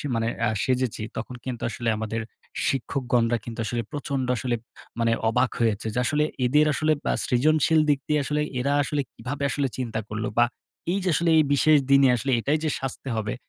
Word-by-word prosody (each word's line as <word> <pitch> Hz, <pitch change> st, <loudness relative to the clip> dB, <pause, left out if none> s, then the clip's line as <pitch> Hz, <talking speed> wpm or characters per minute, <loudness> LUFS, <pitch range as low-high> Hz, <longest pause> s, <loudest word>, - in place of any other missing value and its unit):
মানে 115 Hz, 0 st, 0 dB, 0.2 s
আ -, -, +2 dB
সেজেছি, 130 Hz, -4 st, 0 dB, 0.2 s
তখন 125 Hz, +2 st, -5 dB
কিন্তু 125 Hz, -3 st, -4 dB
আসলে 120 Hz, -1 st, -2 dB
আমাদের 110 Hz, +1 st, -3 dB, 0.5 s
শিক্ষকগণরা 120 Hz, -2 st, +1 dB
কিন্তু 120 Hz, 0 st, -7 dB
আসলে 120 Hz, +2 st, -1 dB
প্রচন্ড 140 Hz, -3 st, -2 dB
আসলে 120 Hz, -1 st, -1 dB, 0.4 s
মানে 115 Hz, 0 st, +2 dB, 0.2 s
অবাক 125 Hz, +2 st, +2 dB
হয়েছে। 110 Hz, -2 st, +1 dB
যে 125 Hz, -, 0 dB
আসলে 150 Hz, +4 st, +2 dB, 0.2 s
এদের 150 Hz, +4 st, +4 dB
আসলে 155 Hz, +1 st, +1 dB
বা -, -, +2 dB
সৃজনশীল 155 Hz, +4 st, +3 dB
দিক 140 Hz, -2 st, +3 dB
দিয়ে, 150 Hz, -1 st, +2 dB
আসলে 150 Hz, 0 st, 0 dB, 0.2 s
এরা 140 Hz, +3 st, +1 dB
আসলে 145 Hz, 0 st, -1 dB
কিভাবে 135 Hz, +4 st, -5 dB
আসলে 140 Hz, 0 st, 0 dB
চিন্তা 115 Hz, -4 st, -2 dB
করলো। 110 Hz, +1 st, -3 dB
বা 120 Hz, -, +6 dB, 0.5 s
এই 195 Hz, -, +1 dB
যে 185 Hz, -, +1 dB
আসলে 170 Hz, +2 st, +1 dB
এই 155 Hz, -, +6 dB
বিশেষ 150 Hz, +2 st, +5 dB
দিনে 140 Hz, -1 st, +7 dB
আসলে 130 Hz, +3 st, -2 dB
এটাই 145 Hz, +6 st, +1 dB
যে 155 Hz, -, +1 dB
সাজতে 135 Hz, 0 st, -5 dB
হবে। 110 Hz, -1 st, -2 dB
130 Hz, 185 wpm, -25 LUFS, 115-145 Hz, 0.5 s, দিনে